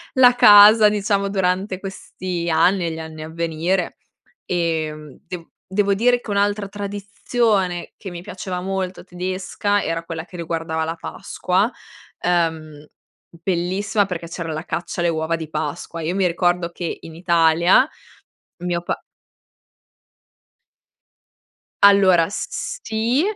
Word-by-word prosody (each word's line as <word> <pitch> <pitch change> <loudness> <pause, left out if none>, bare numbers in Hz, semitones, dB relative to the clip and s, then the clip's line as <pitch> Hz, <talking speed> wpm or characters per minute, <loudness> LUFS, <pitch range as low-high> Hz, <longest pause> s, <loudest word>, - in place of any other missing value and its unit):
la 250 -1 +7
casa, 210 0 +8
diciamo, 200 -1 0
durante 190 0 0
questi 185 -3 -5
anni 170 +3 +3
e - - -2
gli 160 - -6
anni 160 -1 -8
a 155 - -7
venire 170 +3 -1 0.5
e, 165 -3 0
mhmm, 150 -2 -12
de 180 -3 -7 0.2
devo 200 +1 +2
dire 245 +4 +2
che - - -8
un'altra 205 0 +1
tradizione 205 -1 -1
che 200 - -8
mi 175 -1 -8
piaceva 180 0 -5
molto 190 -1 -3
tedesca, 185 +3 -2
era 165 0 -2
quella 165 -1 -6
che 180 0 -12
riguardava 165 -1 -2
la 165 +1 -3
Pasqua. 185 +6 -1 0.5
Ehm, 160 -4 -1 0.4
bellissima 190 +4 -1
perché 170 -3 -5
c'era 165 -1 -5
la 155 +1 -4
caccia 175 0 -4
alle 170 - +2
uova 160 0 -1
di 160 -2 -7
Pasqua. 165 +1 -4
Io 165 +3 -2
mi 195 -1 +2
ricordo 175 0 +1
che 170 -1 -4
in 165 - -10
Italia 170 +5 +4 0.8
mio 175 -1 -1
pa 175 - -3 2.8
Allora, 190 -4 +6
s 200 - -4
s - - -4
sì, 230 +6 +1
180 Hz, 135 wpm, -21 LUFS, 165-200 Hz, 2.8 s, casa